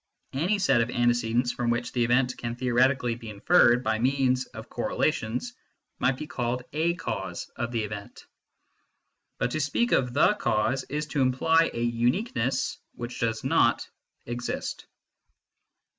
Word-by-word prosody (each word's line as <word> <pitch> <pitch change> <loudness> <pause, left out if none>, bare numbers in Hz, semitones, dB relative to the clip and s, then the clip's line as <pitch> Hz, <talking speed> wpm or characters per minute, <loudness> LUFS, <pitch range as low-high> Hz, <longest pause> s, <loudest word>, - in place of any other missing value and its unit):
Any 175 +10 +1
set 190 -11 +3
of 115 - -1
antecedents 120 0 +1
from 120 -1 -2
which 120 0 -1
the 120 - +1
event 125 +2 +2
can 115 0 -4
theoretically 125 0 +2
be 115 -1 -9
inferred 120 - +4
by 110 -2 0
means 130 0 +1
of - - -10
correla - - 0
tions 125 - -4 0.5
might 125 +1 +2
be 155 - -5
called 125 -4 -2
a 165 +3 +1
cause - - -5
of 120 0 -3
the 115 -2 -1
event. 105 -1 -8 1.1
But 125 - -1
to 155 - -1
speak 155 - +1
oi - - +5
the 125 +10 +3
cause 130 - 0
is 150 +2 -3
to 140 -1 0
imply 160 +6 +3
a 115 - -3
uniqueness 120 - 0 0.2
which 120 +1 -6
does 115 -1 -1
not - - +2 0.4
exist. 120 +1 -4
125 Hz, 150 wpm, -27 LUFS, 120-140 Hz, 1.1 s, oi